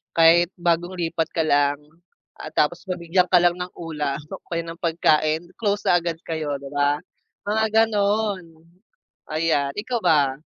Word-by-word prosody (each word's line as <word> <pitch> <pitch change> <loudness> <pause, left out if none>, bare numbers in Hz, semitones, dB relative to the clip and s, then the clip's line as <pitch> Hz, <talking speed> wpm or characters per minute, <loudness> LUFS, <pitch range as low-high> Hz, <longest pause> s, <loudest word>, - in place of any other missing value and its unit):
kahit 170 +1 +6
bagong 175 +1 0
lipat 165 -1 -1
ka 165 - +1
lang, 145 -1 +2 0.6
ah, - - -7
tapos 170 +4 +1
mabigyan 180 +1 +1
ka 180 - +7
lang 175 0 +4
ng 180 0 -5
ulam 150 -4 -3
o - - -7
kaya 170 -1 -1
ng 165 0 -8
pagkain, 160 -1 +2
close 205 -2 0
na - - +5
agad 170 -1 -3
kayo 155 -3 -2
'di 140 - -9
ba? 145 +1 +2 0.5
Mga 220 +1 +2 0.2
gano'n, 205 -2 0 0.9
ayan, 155 -3 +1
ikaw 240 +2 -2
ba? 145 -6 +3
165 Hz, 155 wpm, -23 LUFS, 155-180 Hz, 0.9 s, ka